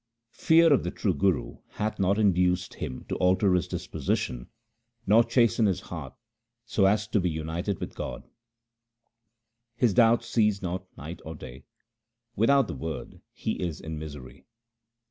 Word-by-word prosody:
Fear 165 -1 +6
of 135 - +2
the 90 - -2
true 95 0 -1
Guru 90 +2 0
hath 105 +1 -3
not 100 +1 +2
induced 90 -3 +2
him 65 - -6
to - - -3
alter 95 +1 +3
his 90 -2 +1
disposition - - -3 0.6
or 110 +4 +6
chasten 115 -2 +3
his 95 -2 0
heart 75 -9 -8 0.5
so 105 -4 +2
as 105 +2 +1
to 105 - +2
be 90 -1 0
united 80 +4 -3
with - - -6
God. - - -6 1.5
His 120 -3 +2
doubts 115 0 +4
cease 105 -3 +2
not 95 -1 -4
night 80 +4 -8
or 80 +1 -7
day; 65 -2 -11 0.7
without 135 +5 +4
the - - -5
Word 80 -1 -6
he - - -4
is 85 -3 -3
in 80 -1 -6
misery. 75 -4 -10
95 Hz, 150 wpm, -27 LUFS, 80-110 Hz, 1.5 s, Fear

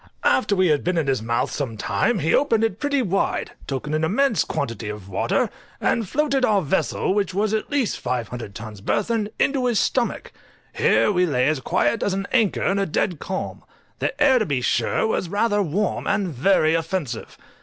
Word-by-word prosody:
After 210 -5 +3
we 185 -2 +3
had 150 -2 +2
been 180 0 0
in 160 - +1
his 135 -4 0
mouth 115 +1 -1
some 125 -6 -4
time 235 - 0
he 160 -2 +1
opened 230 -6 +3
it 225 -2 -1
pretty 285 -2 +1
wide, 195 -2 -1 0.2
took 135 0 -3
in 150 - -4
an 155 +1 0
immense 220 - +2
quantity 115 -5 -4
of 105 -2 -7
water, 100 - 0 0.3
and 225 -5 0
floated 275 -1 +1
our 205 -5 +3
vessel, 185 +4 0
which 195 -3 -1
was 210 +1 +1
at 220 - -1
least 280 -6 0
500 120 -4 -4
tons 105 -2 -8
burthen, 210 - 0
into 265 -2 +1
his 235 -4 +2
stomach; 245 -2 -1 0.4
here - - +3
we 180 -2 +2
lay 125 -4 +1
as 155 -2 +1
quiet 120 -1 0
as 195 - 0
at 195 0 -2
anchor 225 -6 +2
in 195 +1 +1
a 195 - 0
dead 165 +1 -1
calm. 190 +4 -5 0.4
The 275 - -2
air, 270 -4 +5
to 215 - 0
be 140 -4 0
sure, 125 - +1
was 190 -5 -1
rather 205 +1 +1
warm, 195 +3 -1
and 195 -2 +1
very 155 +2 +2
offensive. 165 -7 -3
190 Hz, 195 wpm, -23 LUFS, 140-220 Hz, 0.4 s, air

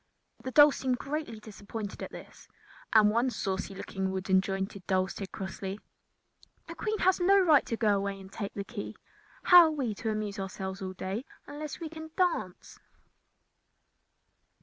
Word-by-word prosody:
The 260 - -3
dolls 290 +2 +7
seemed 255 -2 0
greatly 275 -5 -4
disappointed 210 -1 -7
at - - -6
this, - - -12 0.4
and 215 -2 +6
one 235 +4 +2
saucy 195 -3 -3
looking 190 0 -3
wooden 190 0 +2
jointed 195 0 -4
doll 185 -1 +2
said 190 0 -7
crossly: 195 +1 -5 0.9
"The - - -8
Queen 435 0 -2
has 375 -1 +3
no 385 +3 +5
right 320 -7 +5
to 230 - -2
go 210 -3 +3
away 195 0 -3
and 190 0 -12
take 200 -1 -5
the 200 - -3
key. 205 0 -7 0.5
How 355 -2 +9
are - - +2
we 265 -8 -2
to 220 +2 -4
amuse 215 -2 -3
ourselves 190 0 -5
all 185 -1 -4
day 190 +5 -4 0.2
unless 295 0 -7
we 330 - -4
can 315 0 -9
dance?" 350 - -1
210 Hz, 165 wpm, -30 LUFS, 195-290 Hz, 0.9 s, How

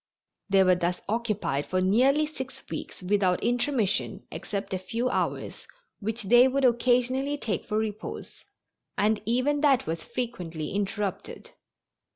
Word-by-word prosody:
They 195 0 +5
were 185 -1 +5
thus 175 0 -1
occupied 215 - -1
for 185 - 0
nearly 255 +11 +4
six 265 -3 -7
weeks - - -6
without 185 -1 +1
intermission 240 -3 0
except 200 -1 -4
a 185 - -1
few 230 +7 -2
hours, - - -2 0.3
which 220 +2 -3
they 240 +5 +6
would 270 +1 +1
occasionally 250 +3 +2
take 225 -7 -3
for 215 - -1
repose, 215 -1 -5 0.5
and 210 +1 +2
even 260 +5 +1
that 275 -5 +4
was 165 +1 -3
frequently 180 -11 -4
interrupted. 200 0 -3
220 Hz, 135 wpm, -27 LUFS, 190-255 Hz, 0.5 s, they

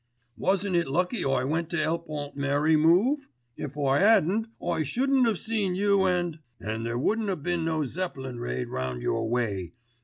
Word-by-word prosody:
"Wasn't 190 0 +1
it 170 -3 +2
lucky 180 - 0
I 135 -2 +1
went 160 +4 -1
to 170 - -2
help 165 +1 -1
Aunt 145 -2 -5
Mary 145 +3 +2
move? 195 - +3 0.3
If 145 0 -6
I 140 -1 +2
hadn't 215 +1 +4
I - - -1
shouldn't 255 - +2
have 220 -4 +1
seen 210 -4 -1
you 200 0 +3
and——" 175 -3 0 0.2
"And 110 +1 -4
there 120 0 -2
wouldn't 215 - 0
a 190 - +1
been 175 +2 -2
no 160 -2 0
Zeppelin 135 -6 -4
raid 60 - -3
round 65 -1 -3
your - - 0
way. 100 -8 -1
165 Hz, 180 wpm, -27 LUFS, 135-190 Hz, 0.3 s, hadn't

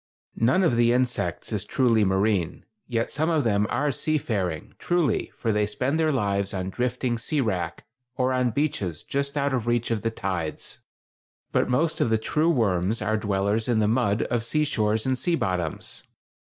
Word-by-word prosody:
None 130 +12 +3
of 125 -9 +3
the 120 0 +4
insects 125 0 0
is - - -1
truly 115 -4 +2
marine, 95 -2 +1 0.2
yet 115 -1 -1
some 155 +3 0
of 160 -3 +2
them 105 -2 +2
are 145 +4 +1
seafaring, 110 - -2
truly, 170 -9 0
for 115 - 0
they 105 0 +1
spend 130 +8 -1
their 160 -1 +3
lives 100 -6 0
on 95 0 -3
drifting 125 0 -1
sea 150 +6 -1
wrack, 90 -9 -2 0.3
or 130 0 +1
on 125 -1 +2
beaches 110 - -2
just 140 +1 -2
out 140 -1 +1
of 120 -3 -1
reach 120 0 +1
of 110 -3 0
the 115 - 0
tides; 90 -7 -4 0.7
but - - +1
most 150 +6 +1
of - - +2
the 110 - +3
true 155 +9 +1
worms 110 - +1
are 110 - 0
dwellers 105 +1 0
in 120 -2 +2
the 105 -1 +3
mud 110 -2 +2
of 120 -2 -1
sea 150 +6 +1
shores 110 -5 0
and 130 -1 0
sea 175 -2 +1
bottoms. 90 - -3
115 Hz, 185 wpm, -25 LUFS, 105-130 Hz, 0.7 s, the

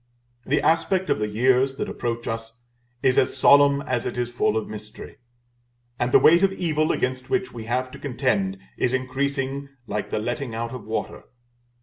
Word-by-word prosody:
The 150 +3 +1
aspect 185 +3 +2
of - - +1
the 105 - 0
years 130 +5 +2
that - - -3
approach 115 -1 -4
us 115 0 -5 0.4
is 130 -1 +4
as 130 - 0
solemn 140 +1 +5
as 125 -2 -1
it 125 - -4
is 120 0 -2
full 110 -2 +1
of 110 - -2
mystery; 105 +1 -9 0.8
and 120 +1 0
the - - +8
weight 170 +2 +6
of 195 -1 +4
evil 155 -5 0
against 130 0 -2
which 195 0 0
we 115 -2 -7
have 130 +2 -1
to - - -10
contend, 120 -8 -1 0.2
is 125 - 0
increasing 135 +1 -2 0.2
like 105 -2 -3
the - - -2
letting 120 +2 -3
out 115 +1 -4
of 125 - -8
water. 110 +1 -4
130 Hz, 185 wpm, -24 LUFS, 115-140 Hz, 0.8 s, the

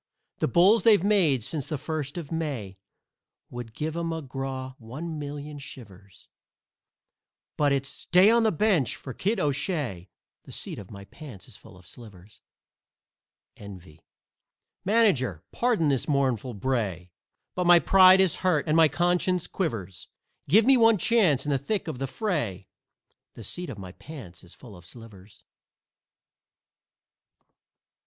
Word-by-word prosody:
The - - +1
bulls 185 - +4
they've 210 -6 +5
made 175 - +2
since 140 +2 -4
the 155 - -3
first 155 +1 -5
of 165 -3 -7
May 135 -13 -4 0.7
Would 120 -2 -8
give 155 +1 -4
a 170 - -3
McGraw 135 -5 -5
one 150 +8 -7
million 145 0 -7
shivers, 100 -8 -13 1.3
But 145 -1 +2
it's 135 0 -1
"stay 185 +4 +3
on 235 0 +4
the 220 -1 +2
bench!" 180 - +1
for 130 - -9
Kid 205 - -1
O'Shay, 145 - -2 0.4
The - - -12
seat - - -5
of 100 - -11
my 100 -2 -11
pants 120 - -12
is - - -9
full 95 - -16
of 90 - -18
slivers. 105 -1 -14 1.2
"ENVY" 90 -6 -12 0.8
Manager, 165 - +1
pardon 230 -11 +1
this 135 -3 -1
mournful 130 -5 0
bray, 100 -7 -3 0.4
But 180 -1 -1
my 175 0 +8
pride 185 +1 +6
is 190 -4 +3
hurt 175 -5 0
and 155 - +2
my 165 -1 +6
conscience 175 +2 0
quivers; 110 - -4 0.4
Give 215 +3 +5
me 265 0 +6
one 225 -2 +5
chance 185 - +2
in 145 - -1
the 135 - +1
thick 200 +9 -3
of 155 -6 -5
the 135 - -2
fray 130 - -3 0.7
The - - -10
seat 180 -1 -6
of 125 - -7
my 95 -2 -9
pants 95 - -12
is 90 - -12
full 115 -6 -14
of 90 - -15
slivers. 105 -1 -14
140 Hz, 145 wpm, -26 LUFS, 110-175 Hz, 1.3 s, my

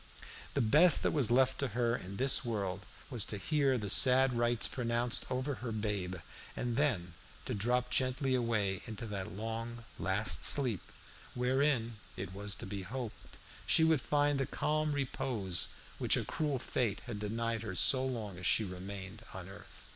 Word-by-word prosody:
The - - +2
best 150 +9 +6
that - - +2
was 135 -8 +2
left 130 +2 +2
to 140 - 0
her 120 -1 +1
in 95 -2 -7
this 135 +3 +4
world 100 -5 -4 0.2
was 120 -5 0
to 105 - -4
hear 135 - +1
the 105 -3 -4
sad 130 +5 +6
rites 120 0 +2
pronounced 120 -1 -1
over 130 +3 -2
her 120 -2 -4
babe, 105 -4 -3 0.4
and 120 -1 -2
then 115 - 0 0.3
to - - -3
drop 125 +4 0
gently 130 +1 +1
away 110 -6 0
into 110 0 -6
that 100 -3 -5
long, 115 +3 -6
last 95 -4 +1
sleep, 125 -9 +5 0.5
wherein, 125 -2 0 0.2
it 95 0 -6
was 100 +1 -4
to - - -7
be 100 0 -5
hoped, 115 +4 -8 0.3
she 160 - +5
would 160 -4 +3
find 145 -1 +1
that 135 - -2
calm 155 0 -1
repose 120 -9 -1 0.3
which - - +3
a - - -2
cruel 150 -3 -2
fate 120 -4 -2
had 115 -4 -7
denied 115 +1 -2
her 105 -4 -6
so 130 +8 +5
long 110 -8 -4
as 90 - -1
she 110 - +3
remained 95 +2 -7
on 95 -1 -7
earth. 100 +1 -13
115 Hz, 170 wpm, -32 LUFS, 100-130 Hz, 0.5 s, best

